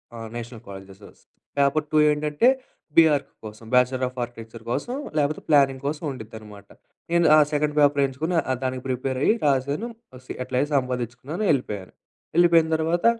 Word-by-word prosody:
ఆ! - - -8 0.2
National 120 -1 -7
colleges. 95 +1 -12 0.4
Paper 140 +2 +2
2 155 - +2
ఏంటంటే, 150 +7 +1 0.5
B.Arch 155 -4 +4
కోసం 110 +1 -10
బ్యాచిలర్ 125 +1 +3
ఆఫ్ 125 +1 -11
ఆర్కిటెక్చర్ 115 -1 -10
కోసం 240 - -2 0.2
లేపోతే 150 +1 0
ప్లానింగ్ 135 -3 +4
కోసం 150 +3 -3
ఉండ్డిద్దనమాట. 110 -4 -11 0.4
నేను 170 0 +3
ఆ! - - +6 0.2
సెకండ్ 150 0 0
పేపర్ 145 -1 +4
ఎంచుకొని 155 +7 -3 0.3
దానికి 130 -1 -3
ప్రిపేర్ 130 +1 -2
అయ్యి 215 - +4
రాసాను. 140 - 0 0.2
ఆహ్, 125 - -12
సి - - -6
ఎట్లయిన 130 +3 -1
సంపాదించుకున్నాను 125 - -2
ఎళ్ళిపోయాను. 105 -9 -3 0.4
ఎళ్ళిపోయిన 170 -2 +5
తర్వాత 165 +2 0
135 Hz, 145 wpm, -24 LUFS, 120-150 Hz, 0.5 s, ఆ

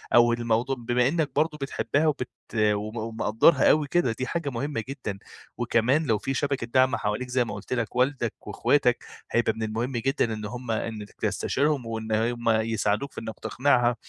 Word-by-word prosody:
أو 120 0 +6
الموضوع 120 +3 0
بما 120 +1 +2
أنكَ 155 -1 0
برضو 155 +1 +1
بتحبها 145 +2 0
وبت 145 -5 -1 0.3
وم 105 +1 +1
ومقدرها 110 +5 +3
أوي 150 -1 +2
كده 175 -6 +2
دي 130 - -2
حاجة 165 -4 -2
مهمّة 130 -1 -3
جدًا. 115 -8 -5 0.4
وكمان 130 +8 +2
لو 110 -6 +2
في 135 +6 -3
شبكة 140 -3 -1
دعم 130 +1 +3
حواليك 105 +4 -2
زي 125 -1 +2
ما 110 - -5
قلت 105 +4 -5
لك، 120 -2 -2
والدك 125 -2 +1
وأخواتك - - +2 0.3
هيبقى 120 -1 +2
من 110 +1 -5
المهم 115 +4 -2
جدًا 120 -1 0
إن 110 -1 -5
همّ 120 +2 -5
أنكَ 110 -2 -3
تستشيرهم، 140 -2 0
وإن 110 -1 -4
همّ 115 +1 0
يساعدوك 110 +3 +1
في - - -7
أنكَ 110 -1 -7
تقنعها، 125 -2 +2
120 Hz, 175 wpm, -26 LUFS, 110-135 Hz, 0.4 s, أو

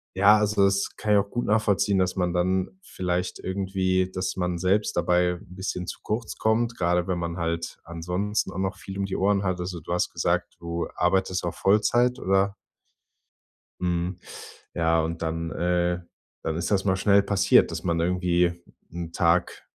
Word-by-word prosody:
ja, 105 +2 +6
also 105 -1 +2
das 100 0 +1
kann 105 - -2
ich 100 - +6
auch 100 0 -2
gut 120 - -2
nachvollziehen, 105 -2 +2
dass 90 0 +1
man 90 -1 0
dann 95 - 0
vielleicht 90 - -2
irgendwie 95 -1 0
dass 95 +1 -2
man 90 -1 -1
selbst 95 +4 +1
dabei 90 +1 +2
'n 90 - -14
bisschen 90 -1 -4
zu - - -6
kurz 110 +1 -3
kommt, 115 +2 +1
gerade 90 0 +1
wenn 90 -2 -1
man 85 0 -3
halt 85 0 -3
ansonsten 90 +5 -2
auch - - -8
noch 95 +1 -2
viel 95 0 -8
um 100 - -1
die 95 - -3
Ohren 100 +1 +2
hat. 90 -1 -1
Also, 90 -2 -4
du 85 - -4
hast 90 - +1
gesagt, - - -1
du 85 0 -3
arbeitest 95 +1 +1
auch 85 - -2
Vollzeit, 120 +5 +2
oder? 95 +1 +1 1.3
Mhm. 90 +1 -1 0.6
Ja, 80 -1 +2
und 85 +1 -4
dann, 80 0 -2
äh 90 0 0 0.4
dann 80 - -1
ist 85 +4 -2
das 95 -1 +2
mal 95 -2 +2
schnell 100 +1 +4
passiert, 100 -2 +4
dass - - -5
man 85 -1 0
irgendwie 90 0 +2 0.4
'n 85 -1 -6
Tag 85 -1 +1
90 Hz, 180 wpm, -25 LUFS, 85-100 Hz, 1.3 s, ja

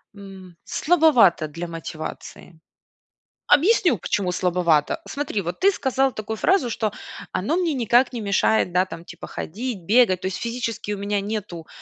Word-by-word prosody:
м, 190 -3 -12
слабовато 290 - +3
для 165 +3 -6
мотивации. 165 0 -8 1.0
Объясню, 350 - +3
почему 180 +1 -1
слабовато. 175 - +1
Смотри, 280 -8 -3
вот 175 0 -5
ты 395 - +5
сказал 270 -5 0
такую 215 +1 -5
фразу, 365 - +2
что: 215 -2 -2 0.4
"Оно 215 - 0
мне 345 -4 0
никак 245 +1 +2
не 235 - -4
мешает, 200 -1 +1
да, 180 +1 +2
там, 170 -3 -9
типа, - - -10
ходить, 225 +5 -5
бегать". 200 -1 +3
То - - -2
есть 190 - -3
физически 230 -3 -4
у - - -4
меня 200 +1 -1
нету, 195 -5 -5
205 Hz, 150 wpm, -23 LUFS, 180-250 Hz, 1.0 s, ты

